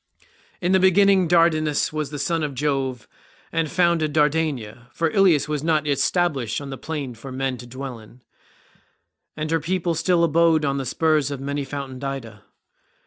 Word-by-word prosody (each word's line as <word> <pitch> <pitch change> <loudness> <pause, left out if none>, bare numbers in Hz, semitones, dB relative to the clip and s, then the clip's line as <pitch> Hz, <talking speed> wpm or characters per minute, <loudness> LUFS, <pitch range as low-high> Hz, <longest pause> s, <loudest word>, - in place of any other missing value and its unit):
"In 180 0 +1
the 190 - +5
beginning 190 0 +4
Dardanus 155 -3 +2
was 155 -2 -2
the 145 - -6
son 165 +3 -1
of 145 -3 -3
Jove, 135 -3 -2 0.4
and 165 -2 -1
founded 170 -3 +1
Dardania, 150 -7 0
for 165 -1 -1
Ilius 185 -8 +3
was 150 -1 -2
not 155 -2 +1
yet 140 -2 0
stablished 145 -11 0
on 140 -1 -7
the 135 - -6
plain 145 -5 -5
for 125 +4 -10
men 130 0 -2
to 120 +1 -11
dwell 130 -1 -7
in, 115 +3 -17 1.1
and 155 +1 -3
her 165 - +2
people 175 +2 -1
still 170 +2 +2
abode 165 -1 +3
on 140 -1 0
the 135 - -4
spurs 155 0 +1
of 140 -2 -5
many 140 +1 -3
fountained 135 -1 -7
Ida. 115 -7 -6
150 Hz, 175 wpm, -23 LUFS, 135-165 Hz, 1.1 s, the